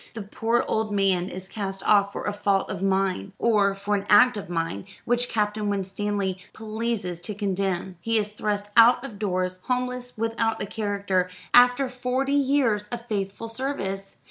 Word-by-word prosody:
The 220 Hz, -, -5 dB
poor 225 Hz, +3 st, 0 dB
old 220 Hz, -1 st, -1 dB
man 195 Hz, -3 st, +1 dB
is 185 Hz, 0 st, -8 dB
cast 195 Hz, -2 st, -5 dB
off 200 Hz, -1 st, +4 dB
for -, -, -6 dB
a 205 Hz, -, -1 dB
fault 200 Hz, -1 st, 0 dB
of 190 Hz, -, -5 dB
mine; 195 Hz, 0 st, 0 dB
or 205 Hz, -4 st, +2 dB
for 200 Hz, +1 st, -3 dB
an 200 Hz, -1 st, -1 dB
act 245 Hz, +4 st, +7 dB
of 205 Hz, -4 st, -6 dB
mine, 165 Hz, 0 st, -2 dB, 0.2 s
which 245 Hz, +1 st, +1 dB
Captain 210 Hz, -1 st, 0 dB
Winstanley 195 Hz, -1 st, -2 dB
pleases 220 Hz, -5 st, -3 dB
to 210 Hz, +3 st, -4 dB
condemn. 190 Hz, -2 st, -2 dB
He 225 Hz, +4 st, +1 dB
is 210 Hz, -1 st, -1 dB
thrust 205 Hz, -1 st, -3 dB
out 240 Hz, +2 st, +6 dB
of 210 Hz, -7 st, -9 dB
doors, 185 Hz, -2 st, -1 dB
homeless, 250 Hz, -1 st, -2 dB
without 225 Hz, 0 st, 0 dB
a -, -, -2 dB
character, 200 Hz, -3 st, -1 dB, 0.2 s
after 245 Hz, +2 st, +6 dB
forty 255 Hz, +2 st, -1 dB
years 265 Hz, -7 st, +2 dB
of 235 Hz, +1 st, -6 dB
faithful 205 Hz, -1 st, -3 dB
service. 195 Hz, -6 st, -4 dB
205 Hz, 170 wpm, -25 LUFS, 195-230 Hz, 0.2 s, act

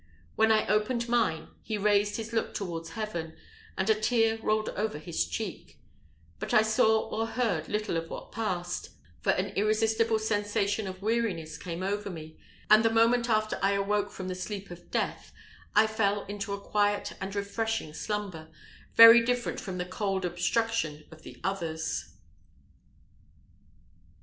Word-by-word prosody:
When 220 Hz, 0 st, +4 dB
I 215 Hz, -1 st, +3 dB
opened 235 Hz, +3 st, +1 dB
mine, 230 Hz, -9 st, +1 dB
he 215 Hz, -1 st, -3 dB
raised 205 Hz, 0 st, +2 dB
his 225 Hz, 0 st, -6 dB
look 225 Hz, -, -1 dB
towards 165 Hz, -4 st, -4 dB
heaven, 175 Hz, -8 st, -4 dB, 0.4 s
and 190 Hz, -, 0 dB
a 220 Hz, -, +6 dB
tear 225 Hz, +1 st, +1 dB
rolled 215 Hz, 0 st, +1 dB
over 210 Hz, -6 st, -2 dB
his 155 Hz, -, -2 dB
cheek; 85 Hz, -2 st, -6 dB, 0.6 s
but -, -, -2 dB
I 215 Hz, -, +7 dB
saw 220 Hz, 0 st, +3 dB
or 225 Hz, +1 st, -1 dB
heard 225 Hz, -10 st, -1 dB
little 210 Hz, -3 st, -1 dB
of 165 Hz, 0 st, -4 dB
what -, -, -8 dB
passed, 180 Hz, -6 st, -3 dB, 0.3 s
for -, -, -2 dB
an 195 Hz, +2 st, -1 dB
irresistible 220 Hz, +2 st, +2 dB
sensation 205 Hz, -1 st, 0 dB
of 185 Hz, +1 st, -8 dB
weariness 205 Hz, -9 st, -1 dB
came 175 Hz, +1 st, -5 dB
over 205 Hz, +1 st, -2 dB
me; 160 Hz, -3 st, -9 dB, 0.3 s
and 215 Hz, +1 st, +7 dB
the 225 Hz, -, +4 dB
moment 230 Hz, +2 st, +3 dB
after 215 Hz, -1 st, +1 dB
I 195 Hz, +1 st, +3 dB
awoke 205 Hz, +1 st, 0 dB
from 185 Hz, -2 st, -7 dB
the 185 Hz, -, -2 dB
sleep 195 Hz, +1 st, -6 dB
of 175 Hz, -, -11 dB
death, -, -, -2 dB, 0.4 s
I 215 Hz, +1 st, +7 dB
fell 205 Hz, -2 st, 0 dB
into 205 Hz, +1 st, -5 dB
a 200 Hz, -, -3 dB
quiet 205 Hz, 0 st, 0 dB
and 190 Hz, +1 st, -4 dB
refreshing 205 Hz, -3 st, -2 dB
slumber, 195 Hz, -4 st, -4 dB, 0.5 s
very 230 Hz, +1 st, +10 dB
different 245 Hz, 0 st, -1 dB
from 190 Hz, -3 st, -5 dB
the 180 Hz, -, -2 dB
"cold 190 Hz, 0 st, -2 dB
obstruction" 175 Hz, -2 st, -1 dB
of 160 Hz, 0 st, -13 dB
the -, -, -12 dB
others. 165 Hz, -5 st, -3 dB
205 Hz, 155 wpm, -29 LUFS, 185-220 Hz, 0.6 s, very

